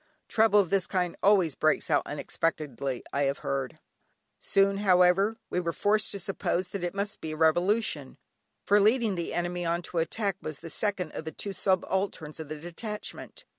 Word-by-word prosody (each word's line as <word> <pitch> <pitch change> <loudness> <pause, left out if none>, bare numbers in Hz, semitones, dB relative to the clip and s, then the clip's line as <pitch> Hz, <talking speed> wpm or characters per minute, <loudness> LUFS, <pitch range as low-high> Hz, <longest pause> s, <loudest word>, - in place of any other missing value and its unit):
Trouble 220 -2 +4
of 195 -3 +1
this 195 -2 +2
kind 180 -2 -1
always 190 -6 +4
breaks 155 +3 +1
out 145 - +4
unexpectedly, 145 -4 -2
I 140 0 +2
have 140 +1 0
heard. 135 -2 -2 0.6
Soon 195 0 +2
however, 195 +2 +4
we 180 - +1
were 170 -2 -1
forced 210 +4 +1
to 200 - -5
suppose 185 -1 -1
that 190 -1 -5
it 175 +2 -2
must 200 +1 -3
be 155 -1 -4
a - - -6
revolution, 165 -2 +1 0.5
for 205 +1 +4
leading 220 +1 +3
the 170 -2 -3
enemy 175 0 -2
on 170 +1 0
to 170 - -3
attack 195 +4 -1
was 155 -2 -5
the 165 +2 -8
second 195 -6 -2
of - - -6
the 160 - -4
two 200 +6 -5
subalterns 185 -4 -1
of 155 -2 -7
the 155 -1 -5
detachment. 210 +6 -7
180 Hz, 180 wpm, -28 LUFS, 160-200 Hz, 0.6 s, Trouble